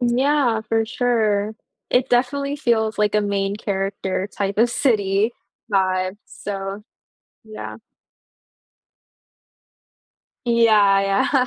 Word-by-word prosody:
Yeah, 250 Hz, -1 st, +2 dB
for 225 Hz, 0 st, +2 dB
sure. 220 Hz, -4 st, 0 dB, 0.4 s
It 255 Hz, +1 st, +2 dB
definitely 280 Hz, +3 st, +1 dB
feels 225 Hz, -6 st, 0 dB
like 210 Hz, 0 st, +1 dB
a 210 Hz, -, +4 dB
main 200 Hz, -1 st, -1 dB
character 195 Hz, -2 st, -2 dB
type 200 Hz, 0 st, -2 dB
of 235 Hz, +2 st, +4 dB
city 215 Hz, -3 st, +1 dB, 0.4 s
vibe, 185 Hz, 0 st, +1 dB
so, 200 Hz, -4 st, -6 dB, 0.6 s
yeah. 215 Hz, -1 st, -8 dB, 2.7 s
Yeah, 215 Hz, -4 st, +5 dB
yeah. 195 Hz, +7 st, +2 dB
215 Hz, 95 wpm, -21 LUFS, 195-240 Hz, 2.7 s, Yeah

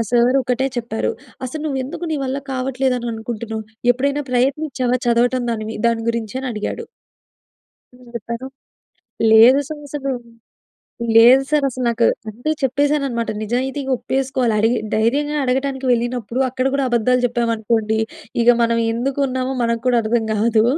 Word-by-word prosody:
Sir 245 Hz, +2 st, +4 dB
ఒకటే 255 Hz, +2 st, 0 dB
చెప్పారు. 235 Hz, -2 st, -2 dB, 0.3 s
"అసలు 300 Hz, +5 st, -5 dB
నువ్వు 270 Hz, -3 st, -2 dB
ఎందుకు, 305 Hz, +6 st, -6 dB
నీ -, -, 0 dB
వల్ల 265 Hz, +1 st, -2 dB
కావట్లేదు, 260 Hz, 0 st, 0 dB
అని 240 Hz, -, -4 dB
అనుకుంటున్నావు. 225 Hz, -1 st, -5 dB, 0.3 s
ఎప్పుడైనా 280 Hz, +3 st, -1 dB
ప్రయత్నించావా? 255 Hz, -1 st, 0 dB
చదవటం 245 Hz, +1 st, +2 dB
దాని 215 Hz, -2 st, -3 dB
మీ -, -, -5 dB
దాని 230 Hz, -1 st, -1 dB
గురించి" 230 Hz, +1 st, -4 dB
అని 265 Hz, -, -4 dB
అడిగాడు. 220 Hz, -, -4 dB, 1.1 s
నేను 250 Hz, -1 st, -17 dB
చెప్పాను, 235 Hz, +3 st, -5 dB, 0.9 s
"లేదు 235 Hz, +5 st, +8 dB
సార్ 305 Hz, -1 st, -6 dB
అసలు 275 Hz, -1 st, -3 dB, 1.1 s
లేదు 245 Hz, +4 st, +8 dB
సార్ 300 Hz, -2 st, +2 dB
అసలు 255 Hz, 0 st, -4 dB
నాకు" 230 Hz, 0 st, +2 dB, 0.2 s
అంటే, 245 Hz, +8 st, -4 dB
చెప్పేసాననమాట. 275 Hz, -3 st, 0 dB
నిజాయితీగా, 265 Hz, +4 st, -2 dB
ఒప్పేసుకోవాలి. 260 Hz, -4 st, 0 dB
అడిగి 225 Hz, +3 st, +2 dB, 0.2 s
దైర్యంగా 285 Hz, +7 st, +1 dB
అడగటానికి 265 Hz, +1 st, -1 dB
వెళ్ళినపుడు, 240 Hz, 0 st, -1 dB
అక్కడ 255 Hz, +1 st, -1 dB
కూడా 275 Hz, -1 st, +1 dB
అబద్ధాలు 245 Hz, +2 st, +2 dB
చెప్పమనుకోండి, 225 Hz, -2 st, 0 dB, 0.4 s
ఇగ 235 Hz, -, +2 dB
మనం 230 Hz, 0 st, +2 dB
ఎందుకు 265 Hz, +4 st, -2 dB
ఉన్నామో, 260 Hz, +1 st, -2 dB
మనకు 230 Hz, -1 st, 0 dB
కూడా 245 Hz, -1 st, +4 dB
అర్థం 225 Hz, 0 st, 0 dB
కాదు. 220 Hz, +1 st, +2 dB
250 Hz, 140 wpm, -20 LUFS, 230-265 Hz, 1.1 s, లేదు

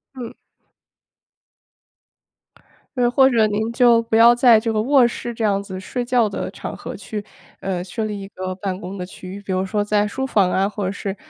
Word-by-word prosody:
嗯。 245 Hz, -3 st, -8 dB, 2.6 s
呃， 245 Hz, -1 st, +3 dB
或 265 Hz, +1 st, +5 dB
者 230 Hz, -4 st, +3 dB
您 215 Hz, +2 st, -1 dB
就 235 Hz, -1 st, +4 dB
不 225 Hz, -1 st, -2 dB
要 230 Hz, +1 st, +7 dB
在 240 Hz, -2 st, +5 dB
这 225 Hz, 0 st, -2 dB
个 215 Hz, -, +1 dB
卧 260 Hz, +1 st, +4 dB
室 240 Hz, 0 st, -5 dB
这 230 Hz, -1 st, -5 dB
样 200 Hz, -2 st, +1 dB
子 190 Hz, -2 st, -7 dB
睡 245 Hz, +6 st, -4 dB
觉 240 Hz, -2 st, +2 dB
的 200 Hz, -, -4 dB
场 -, -, -7 dB
合 -, -, -8 dB
去， 210 Hz, -2 st, -6 dB, 0.4 s
呃， 185 Hz, -2 st, -3 dB
设 190 Hz, +4 st, -4 dB
立 210 Hz, -1 st, -4 dB
一 195 Hz, -, -8 dB
个 185 Hz, -1 st, -5 dB
办 190 Hz, -1 st, -4 dB
公 190 Hz, +2 st, -7 dB
的 180 Hz, -, -5 dB
区 185 Hz, 0 st, -11 dB
域， 200 Hz, -, -7 dB
比 200 Hz, -1 st, -7 dB
如 185 Hz, 0 st, 0 dB
说 205 Hz, +2 st, -1 dB
在 210 Hz, 0 st, +1 dB
书 265 Hz, +6 st, -3 dB
房 200 Hz, -8 st, +2 dB
啊， 195 Hz, +1 st, +1 dB
或 210 Hz, 0 st, -5 dB
者 190 Hz, -, -1 dB
是 200 Hz, -1 st, -5 dB
210 Hz, 225 characters per minute, -21 LUFS, 195-235 Hz, 2.6 s, 要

